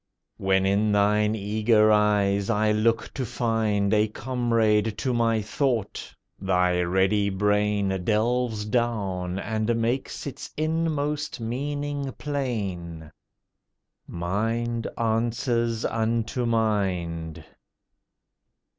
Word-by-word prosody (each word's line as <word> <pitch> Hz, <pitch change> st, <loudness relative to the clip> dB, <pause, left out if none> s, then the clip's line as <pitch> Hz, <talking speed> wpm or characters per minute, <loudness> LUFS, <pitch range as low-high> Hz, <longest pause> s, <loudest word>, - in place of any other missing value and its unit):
When 95 Hz, 0 st, +2 dB
in 100 Hz, +2 st, +2 dB
thine 105 Hz, +1 st, +2 dB
eager 110 Hz, +1 st, +3 dB
eyes 100 Hz, -2 st, +2 dB
I 110 Hz, -1 st, +2 dB
look 110 Hz, +1 st, +1 dB
to 135 Hz, -, -3 dB
find 110 Hz, -4 st, 0 dB
A 105 Hz, 0 st, +3 dB
comrade 110 Hz, -2 st, 0 dB
to 130 Hz, +1 st, -1 dB
my 115 Hz, -2 st, +1 dB
thought, 120 Hz, -1 st, -2 dB, 0.3 s
thy 90 Hz, -2 st, +2 dB
ready 95 Hz, +3 st, +2 dB
brain 105 Hz, -1 st, +1 dB
Delves 110 Hz, +1 st, 0 dB
down 100 Hz, -6 st, -1 dB
and 110 Hz, +3 st, -1 dB
makes 120 Hz, +4 st, -2 dB
its 140 Hz, -, -7 dB
inmost 155 Hz, -3 st, -1 dB
meaning 140 Hz, +4 st, -3 dB
plain: 95 Hz, -, -4 dB, 1.0 s
Mind 115 Hz, +6 st, -2 dB
answers 115 Hz, 0 st, 0 dB
unto 115 Hz, +2 st, -1 dB
mind. 95 Hz, -8 st, -1 dB
110 Hz, 95 wpm, -25 LUFS, 100-120 Hz, 1.0 s, eager